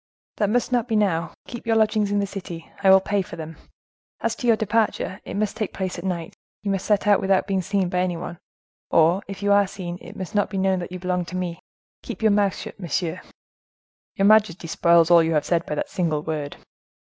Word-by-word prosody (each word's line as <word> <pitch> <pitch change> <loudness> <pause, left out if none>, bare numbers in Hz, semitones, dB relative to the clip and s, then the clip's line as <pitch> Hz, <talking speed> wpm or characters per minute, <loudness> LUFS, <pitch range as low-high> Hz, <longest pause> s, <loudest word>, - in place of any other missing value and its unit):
"That 205 - +1
must 245 +3 +1
not 245 -1 +1
be 225 - 0
now—keep 210 +4 -2
your 225 - +3
lodgings 215 -1 +2
in 205 - +1
the 200 - +1
city: 180 -4 -8
I 195 - +4
will 190 0 +8
pay 200 +1 0
for 175 - -8
them. 160 -1 -7 0.6
As 230 0 -1
to 245 - -3
your 230 - +6
departure, 215 -3 0
it - - -5
must 215 0 -1
take 215 -3 -4
place 185 -2 -3
at - - -8
night; 175 -3 -3 0.3
you 200 - -1
must 195 -1 -2
set 210 -1 +2
out 205 -1 +5
without 190 -1 +2
being 195 -2 0
seen 195 0 0
by 180 0 -1
any 180 -1 0
one, 175 0 -7 0.5
or, 170 +4 +4
if 195 0 -7
you 205 - +2
are 200 -1 +4
seen, 180 -2 -6
it - - -11
must 185 -2 -6
not 205 -1 +1
be 195 - -4
known 190 -1 +2
that 175 - -6
you 185 - -5
belong 180 0 -1
to 185 - -8
me. 175 -2 -3 0.4
Keep - - -7
your 220 - +5
mouth 200 -1 +2
shut, - - -9
monsieur." 175 0 -2 0.9
"Your 195 - +2
majesty 210 -5 +4
spoils 170 0 +4
all 170 -1 +8
you 165 0 +1
have 150 -2 +1
said 170 -1 0
by 150 - -2
that - - -2
single 160 -5 -1
word." 150 -3 -4
190 Hz, 230 wpm, -23 LUFS, 175-205 Hz, 0.9 s, will